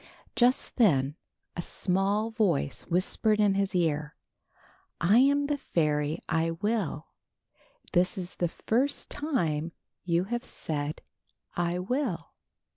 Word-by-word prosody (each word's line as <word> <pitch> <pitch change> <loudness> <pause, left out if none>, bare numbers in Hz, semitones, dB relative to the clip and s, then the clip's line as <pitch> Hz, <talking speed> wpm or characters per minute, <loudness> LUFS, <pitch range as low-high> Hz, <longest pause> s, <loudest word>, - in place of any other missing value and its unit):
'' - - -30
Just 250 +1 +2
then 145 - +3 0.4
a 175 - -2
small 200 +5 0
voice 195 -11 0
whispered 210 +4 +1
in 205 -2 +4
his 195 -1 0
ear: 150 -4 0 0.8
"I 200 +8 +5
am 285 +2 +4
the 285 0 -1
fairy 150 - 0
I 165 0 +1
Will. 170 -3 -2 0.8
This 180 +2 +3
is 180 -1 -5
the 175 - +1
first 255 - -1
time 170 - -1 0.3
you 170 -1 +1
have 240 +5 -3
said 150 -1 -4 0.5
T 175 0 0
will. 230 - -2
180 Hz, 120 wpm, -28 LUFS, 165-225 Hz, 0.8 s, I